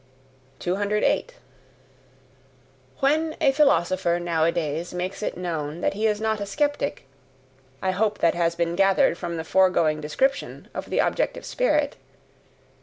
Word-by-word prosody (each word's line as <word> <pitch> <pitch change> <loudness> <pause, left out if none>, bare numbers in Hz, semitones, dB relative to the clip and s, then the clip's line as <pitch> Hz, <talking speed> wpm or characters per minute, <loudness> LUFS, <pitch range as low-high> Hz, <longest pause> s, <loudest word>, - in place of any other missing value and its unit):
208. 205 +4 0 1.7
When 310 +3 +2
a 270 - +4
philosopher 185 - +2
nowadays 170 0 -1
makes 185 +3 -4
known 165 -3 -4
that - - +1
he 215 +2 0
is 210 -1 0
not 220 -1 -1
a - - -2
skeptic 290 - -1 0.8
I 190 - +2
hope 210 +2 0
that 165 - +3
has 170 -1 0
been 170 0 -1
gathered 195 -2 +3
from 170 -1 -5
the 160 - -3
foregoing 165 -4 +2
description 265 - -1
of - - -6
the - - -2
objective - - 0
spirit? - - 0
180 Hz, 125 wpm, -24 LUFS, 170-210 Hz, 1.7 s, a